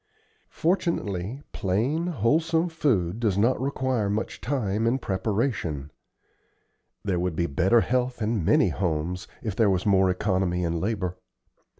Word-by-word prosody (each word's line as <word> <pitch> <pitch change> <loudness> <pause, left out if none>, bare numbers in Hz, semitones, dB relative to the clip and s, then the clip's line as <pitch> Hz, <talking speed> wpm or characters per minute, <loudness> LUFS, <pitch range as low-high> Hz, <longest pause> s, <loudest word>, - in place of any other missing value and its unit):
Fortunately, 140 - -1
plain, 120 - 0
wholesome 160 - +1
food 115 - 0
does 105 -5 +1
not 120 +5 +2
require 130 -5 0
much 105 +2 -3
time 115 -4 0
in 125 +3 +2
preparation. 95 - -2 1.1
There 95 -3 0
would 90 -2 -1
be 85 - +1
better 85 +10 +3
health 125 0 0
in 110 -3 0
many - - +4
homes 90 0 -2 0.2
if 110 -4 -3
there 110 -2 +3
was 95 -1 0
more 95 -2 +4
economy 90 -1 0
in 85 0 -1
labor. 95 -2 -2
105 Hz, 130 wpm, -26 LUFS, 90-130 Hz, 1.1 s, many